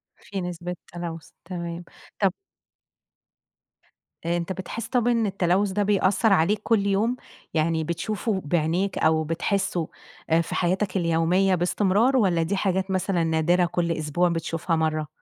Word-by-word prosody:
في 195 Hz, -2 st, -6 dB
نسبة 180 Hz, 0 st, -5 dB, 0.2 s
تلوّث، 165 Hz, -3 st, -6 dB, 0.2 s
تمام، 170 Hz, -1 st, -5 dB, 0.4 s
طَب 195 Hz, -3 st, +3 dB, 1.9 s
آآ 170 Hz, +1 st, +1 dB
أنت 170 Hz, +2 st, -3 dB
بتحس 200 Hz, +5 st, -6 dB
طَب 245 Hz, -1 st, +1 dB
إن 230 Hz, -2 st, +2 dB
التلوث 195 Hz, 0 st, +1 dB
ده 205 Hz, +2 st, +1 dB
بيأثّر 200 Hz, +1 st, +3 dB
عليك 195 Hz, +4 st, +2 dB
كل 215 Hz, -4 st, +2 dB
يوم، 215 Hz, +5 st, +1 dB, 0.4 s
يعني 160 Hz, 0 st, +1 dB
بتشوفه 190 Hz, +5 st, -2 dB
بعينيك 170 Hz, +5 st, 0 dB
أو 160 Hz, 0 st, +3 dB
بتحسّه 175 Hz, +1 st, -1 dB, 0.4 s
آآ 165 Hz, +1 st, +4 dB
في -, -, -5 dB
حياتك 185 Hz, +2 st, 0 dB
اليومية 175 Hz, +3 st, +2 dB
باستمرار، 205 Hz, +8 st, +2 dB
والّا 180 Hz, -7 st, +3 dB
دي 180 Hz, +5 st, -1 dB
حاجات 190 Hz, 0 st, 0 dB
مثلًا 185 Hz, -2 st, 0 dB
نادرة 165 Hz, +2 st, +2 dB
كل 170 Hz, 0 st, -1 dB
أسبوع 165 Hz, +3 st, +1 dB
بتشوفها 165 Hz, 0 st, -1 dB
مَرّة؟ 155 Hz, -1 st, 0 dB
180 Hz, 140 wpm, -25 LUFS, 165-195 Hz, 1.9 s, آآ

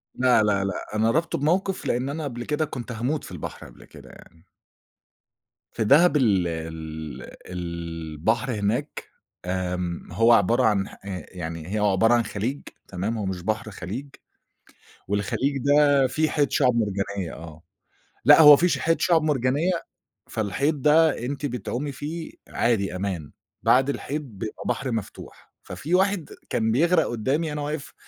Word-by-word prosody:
لا، 125 Hz, -3 st, +4 dB
لا، 100 Hz, -2 st, +1 dB
لأ، 95 Hz, +2 st, -4 dB
أنا 110 Hz, +1 st, +3 dB
رابطه 165 Hz, +5 st, 0 dB
بموقف 180 Hz, +6 st, 0 dB
لإن 125 Hz, +3 st, 0 dB
أنا 155 Hz, +3 st, -4 dB
قبل 120 Hz, -4 st, -5 dB
كده 150 Hz, +1 st, 0 dB
كنت 125 Hz, -5 st, -7 dB
هاموت 125 Hz, +6 st, -2 dB
في -, -, -10 dB
البحر 90 Hz, -4 st, -7 dB
قبل -, -, -16 dB
كده -, -, -15 dB
يعني. 85 Hz, +1 st, -17 dB, 1.3 s
في -, -, -1 dB
دهب 150 Hz, +8 st, +5 dB
ال 100 Hz, -10 st, +2 dB
ال 80 Hz, -2 st, -6 dB, 0.2 s
البحر 85 Hz, -, -3 dB
هناك 110 Hz, +7 st, -2 dB, 0.4 s
آمم، 90 Hz, -1 st, -3 dB
هو 115 Hz, +6 st, +4 dB
عبارة 115 Hz, +1 st, +3 dB
عن 100 Hz, -3 st, +2 dB
ح -, -, -13 dB
آآ، 95 Hz, -2 st, -5 dB
يعني 85 Hz, 0 st, -6 dB
هي -, -, 0 dB
عبارة 105 Hz, +3 st, +3 dB
عن 120 Hz, -, +3 dB
خليج، 115 Hz, +6 st, -3 dB, 0.3 s
تمام، 100 Hz, +5 st, -3 dB
هو 105 Hz, -, -3 dB
مش 95 Hz, -2 st, -3 dB
بحر، 110 Hz, +2 st, -2 dB
خليج، 105 Hz, +8 st, -6 dB, 1.0 s
والخليج 105 Hz, +8 st, -1 dB
ده 140 Hz, 0 st, +4 dB
في 155 Hz, +5 st, 0 dB
حيض 145 Hz, -2 st, +1 dB
شُعب 125 Hz, -, +3 dB
مرجانية 100 Hz, -4 st, -2 dB
آه، 80 Hz, -1 st, -11 dB, 0.6 s
لأ 145 Hz, +5 st, +8 dB
هو 150 Hz, -2 st, +10 dB
ما 145 Hz, -, +11 dB
في 175 Hz, +5 st, +2 dB
ش -, -, 0 dB
حيض 165 Hz, +1 st, +1 dB
شُعب 165 Hz, -3 st, +3 dB
مرجانية، 145 Hz, +3 st, +1 dB, 0.6 s
فالحيض 140 Hz, +8 st, -1 dB
ده 155 Hz, +2 st, +4 dB
أنتِ 140 Hz, +2 st, -3 dB
بتعومي 125 Hz, +3 st, -3 dB
فيه 155 Hz, +5 st, -6 dB, 0.2 s
عادي 105 Hz, -6 st, 0 dB
أمان، 90 Hz, -6 st, -4 dB, 0.3 s
بعد 135 Hz, +2 st, +4 dB
الحيض 145 Hz, +1 st, -3 dB
بيبقى 110 Hz, -6 st, -8 dB
بحر 125 Hz, +1 st, -1 dB
مفتوح، 110 Hz, -3 st, -7 dB
ففي 165 Hz, +5 st, -2 dB
واحد 190 Hz, -3 st, +1 dB, 0.2 s
كان 110 Hz, -2 st, +1 dB
بيغرق 165 Hz, +7 st, +3 dB
قدّامي، 135 Hz, +8 st, -1 dB
أنا 150 Hz, -, -3 dB
واقف 145 Hz, 0 st, -5 dB
115 Hz, 155 wpm, -24 LUFS, 95-145 Hz, 1.3 s, ما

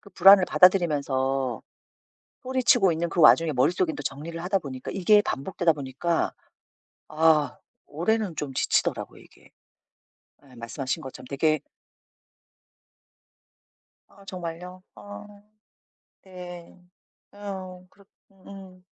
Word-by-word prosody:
그 200 Hz, -, -17 dB
불안을 190 Hz, +1 st, +7 dB
받아들이면서 135 Hz, -, +2 dB, 0.8 s
소리치고 255 Hz, -8 st, +3 dB
있는 165 Hz, +1 st, -2 dB
그 175 Hz, -, -1 dB
와중에 160 Hz, 0 st, +6 dB
머릿속에는 160 Hz, +6 st, +1 dB
또 145 Hz, -, -7 dB
정리를 160 Hz, +5 st, -6 dB
하다 195 Hz, +1 st, 0 dB
보니까 130 Hz, -5 st, -8 dB
이게 205 Hz, +2 st, +4 dB
반복되다 170 Hz, 0 st, -1 dB
보니까 145 Hz, +4 st, -2 dB, 0.7 s
아 155 Hz, -1 st, +2 dB, 0.3 s
올해는 185 Hz, +3 st, -1 dB
좀 140 Hz, -3 st, -5 dB
지치더라고요 -, -, -1 dB
이게. -, -, -21 dB, 1.0 s
예 130 Hz, -, -18 dB
말씀하신 130 Hz, +6 st, -5 dB
것처럼 130 Hz, -2 st, -10 dB
되게 155 Hz, +2 st, 0 dB, 2.5 s
아 200 Hz, -, -20 dB
정말요? 180 Hz, 0 st, -8 dB
아. 100 Hz, -1 st, -11 dB, 1.0 s
네. 180 Hz, -2 st, -11 dB, 0.5 s
어 190 Hz, -3 st, -8 dB
그렇 200 Hz, +1 st, -23 dB, 0.3 s
응. 190 Hz, -1 st, -14 dB
170 Hz, 240 characters per minute, -25 LUFS, 145-185 Hz, 2.5 s, 불안을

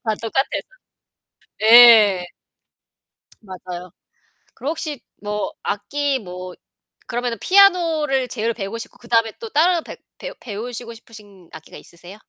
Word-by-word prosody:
다 220 Hz, -2 st, 0 dB
똑같아요. 230 Hz, +4 st, -1 dB, 1.0 s
예. 220 Hz, -5 st, +8 dB, 1.2 s
맞아요. 180 Hz, -3 st, -9 dB, 0.6 s
그럼 280 Hz, -, -4 dB
혹시 310 Hz, -4 st, -5 dB, 0.2 s
뭐 210 Hz, 0 st, -3 dB
악기 275 Hz, +7 st, -2 dB
뭐 180 Hz, -3 st, -9 dB, 0.5 s
그러면은 240 Hz, -1 st, -3 dB
피아노를 330 Hz, -9 st, +3 dB
제일 230 Hz, -1 st, -2 dB
배우고 205 Hz, 0 st, -6 dB
싶고 230 Hz, -, -9 dB
그다음에 230 Hz, -2 st, 0 dB
또 455 Hz, -, -8 dB
다른 340 Hz, 0 st, +2 dB
배 -, -, -10 dB, 0.2 s
배우 -, -, -8 dB
배우시고 235 Hz, +2 st, -7 dB
싶으신 205 Hz, -6 st, -16 dB
악기가 160 Hz, -, -12 dB
있으세요? 175 Hz, +4 st, -14 dB
230 Hz, 275 characters per minute, -20 LUFS, 205-270 Hz, 1.2 s, 예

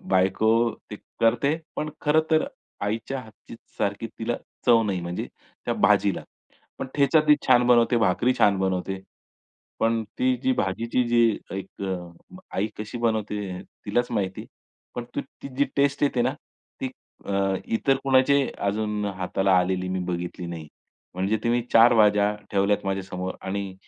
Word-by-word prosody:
बायको 95 Hz, +4 st, +2 dB, 0.4 s
ते 105 Hz, -, -5 dB, 0.2 s
करते. 120 Hz, +6 st, +3 dB, 0.2 s
पण 155 Hz, -, -2 dB
खरं 150 Hz, +1 st, +4 dB
तर 155 Hz, 0 st, +3 dB, 0.4 s
आईच्या 115 Hz, +6 st, -2 dB
हातची 110 Hz, -1 st, -13 dB, 0.2 s
सारखी 100 Hz, +3 st, -1 dB
तिला 115 Hz, +1 st, -1 dB, 0.3 s
चव 115 Hz, -2 st, +6 dB
नाही, 100 Hz, -4 st, -1 dB
म्हणजे 85 Hz, +1 st, -4 dB, 0.4 s
त्या -, -, 0 dB
भाजीला. -, -, +3 dB, 0.6 s
पण -, -, -3 dB
ठेचा 145 Hz, +2 st, +4 dB
ती 150 Hz, -, +9 dB
छान 125 Hz, -1 st, +5 dB
बनवते, 120 Hz, 0 st, +5 dB
भाकरी 115 Hz, +3 st, +2 dB
छान 100 Hz, -2 st, +4 dB
बनवते. 95 Hz, 0 st, -1 dB, 0.8 s
पण 115 Hz, 0 st, +2 dB, 0.2 s
ती 130 Hz, 0 st, +2 dB
जी 130 Hz, -, +3 dB
भाजीची 115 Hz, +3 st, 0 dB
जी 120 Hz, 0 st, +4 dB, 0.4 s
एक 95 Hz, -, -8 dB
अ, 90 Hz, -, -7 dB, 0.2 s
आई 100 Hz, -, +1 dB
कशी 105 Hz, +3 st, -5 dB
बनवते 105 Hz, -5 st, -1 dB, 0.2 s
तिलाच 120 Hz, 0 st, +1 dB
माहिती, 95 Hz, -5 st, -2 dB, 0.5 s
पण 120 Hz, -, -4 dB
तु -, -, 0 dB, 0.2 s
ती -, -, -5 dB
जी 140 Hz, -, +5 dB
टेस्ट 140 Hz, 0 st, +2 dB
येते 135 Hz, -4 st, +2 dB
ना, 130 Hz, +3 st, 0 dB, 0.5 s
ती 130 Hz, -, -1 dB, 0.4 s
अ, 100 Hz, -1 st, +1 dB
इतर 135 Hz, +4 st, +1 dB
कुणाची 135 Hz, +1 st, +4 dB, 0.3 s
अजून 105 Hz, 0 st, -1 dB
हाताला 95 Hz, 0 st, 0 dB
आलेली 90 Hz, 0 st, 0 dB
मी 95 Hz, 0 st, -1 dB
बघितली 90 Hz, +1 st, -4 dB
नाही. 80 Hz, -3 st, -7 dB, 0.5 s
म्हणजे 95 Hz, +4 st, 0 dB
तुम्ही 120 Hz, +1 st, +2 dB
4 115 Hz, +1 st, +7 dB
भाज्या 105 Hz, -1 st, +4 dB, 0.2 s
ठेवल्यात 100 Hz, +1 st, +1 dB
माझ्यासमोर 95 Hz, -1 st, -3 dB
आणि 95 Hz, 0 st, -4 dB
105 Hz, 150 wpm, -25 LUFS, 95-120 Hz, 0.8 s, ती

